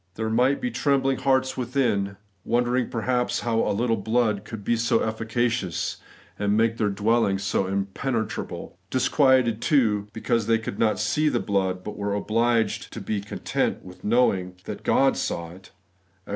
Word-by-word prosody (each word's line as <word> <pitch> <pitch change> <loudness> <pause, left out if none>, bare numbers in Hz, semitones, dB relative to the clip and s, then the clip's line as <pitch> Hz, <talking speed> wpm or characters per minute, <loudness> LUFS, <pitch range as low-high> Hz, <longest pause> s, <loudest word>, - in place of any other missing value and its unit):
* - - -44
There 110 +1 -2
might 125 +5 +3
be 125 - -2
trembling 135 +1 +1
hearts 130 -1 +1
within, 120 -6 0 0.3
wondering 120 0 +1
perhaps 125 +2 0
how 115 -1 0
a - - +1
Uttle 115 0 0
blood 110 -3 +1
could 110 -2 -7
r - - -15
be 120 - +1
so 115 0 +2
efficacious, 110 -3 -1 0.4
and 105 0 +1
make 115 0 +2
their 105 -3 +1
dwelling 105 0 +2
so 95 0 -1
im* 100 +1 0
pregnable; 115 -10 -3
disquieted, 130 -2 +3
too, 110 -10 +2
because 110 0 -1
they 115 0 +4
could 110 -3 -6
not 110 -2 +2
see 150 +9 +1
the 120 - 0
blood, 95 -4 -1
but 105 - -7
were 100 0 -1
obliged 115 +2 0
to - - -5
be 105 -2 -2
content 100 - -2
with 90 0 -13
knowing 100 -6 +2
that - - -6
God - - +3
saw 85 -1 -3
it 95 +2 -14 0.6
(Ex. - - -14
115 Hz, 170 wpm, -25 LUFS, 100-125 Hz, 0.6 s, they